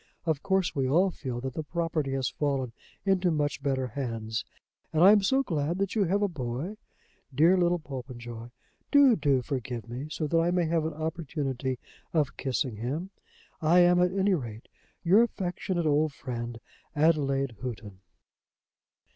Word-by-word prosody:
Of 160 -4 0
course, 190 -2 +1
we 135 -2 +1
all 180 +7 +4
feel 125 -7 -5
that 130 0 -4
the 160 - -3
property 160 -3 -2
has 135 -1 0
fallen 135 -4 -1 0.3
into 190 -2 +3
much 150 -3 -1
better 135 -2 0
hands. 115 -3 -3 0.5
And 160 +1 +3
I 195 - +10
am 210 -1 +6
so 265 +7 +2
glad 165 - -1
that 195 0 -1
you 210 -3 +2
have 200 +4 +1
a - - +3
boy. 145 - -4 0.6
Dear 165 +7 +6
little 175 -1 +3
Popenjoy! 120 -5 -8 0.4
Do, 280 -4 +7
do 140 -8 +2
forgive 125 -4 -4
me, 125 +5 -5
so 155 0 -3
that 165 +3 +2
I 165 +1 +2
may 175 -1 +2
have 160 -1 +1
an 160 - -3
opportunity 145 -5 -3 0.4
of 155 -2 +1
kissing 130 -4 -2
him. 145 - -3 0.5
I 170 +3 +5
am, 175 0 +5
at 180 0 +3
any 195 +1 +2
rate, 115 -9 -4 0.3
"Your 190 +6 +6
affectionate 185 -5 -1
old 150 0 +2
friend, 120 -3 -5 0.4
"ADELAIDE 140 -5 +2
HOUGHTON." 110 -6 -6
150 Hz, 165 wpm, -28 LUFS, 130-175 Hz, 0.6 s, I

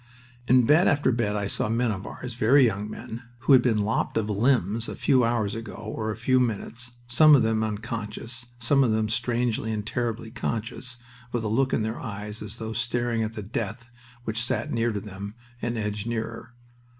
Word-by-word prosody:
In 125 -1 +6
bed 155 +8 +5
after 145 -3 +3
bed 115 -3 0
I 100 -1 -1
saw 100 - -1
men 115 +1 +1
of 100 -2 -5
ours, 125 -1 -6
very 125 +4 +5
young 105 -2 -1
men, 110 +2 -7 0.2
who 135 - +5
had 130 - +8
been 120 -3 +2
lopped 105 +2 0
of 110 -1 0
limbs 115 0 +1
a - - -5
few 130 -4 +3
hours 115 -3 +1
ago 115 -1 -6
or 110 0 -4
a 110 - -2
few 130 +4 +2
minutes, 120 +1 -2
some 150 +5 +7
of 135 - +4
them 110 -1 +1
unconscious, 115 +2 -5
some 135 +4 +3
of 125 - +2
them 110 0 +1
strangely 115 0 0
and 105 -1 -3
terribly 115 -1 -2
conscious, 120 +1 -4 0.3
with 120 -2 -1
a - - -1
look 130 +5 +2
in 110 - +1
their 110 +1 -3
eyes 105 -1 -6
as 105 +1 -7
though 110 -1 -4
staring 120 0 0
at 110 0 -2
the 105 - -6
death 115 +3 -4 0.3
which 115 0 -2
sat - - -1
near 115 0 +1
to 105 - -2
them, 100 +1 -8 0.3
and 120 0 -2
edged 105 0 -3
nearer. 115 +1 -4
115 Hz, 200 wpm, -26 LUFS, 110-120 Hz, 0.3 s, had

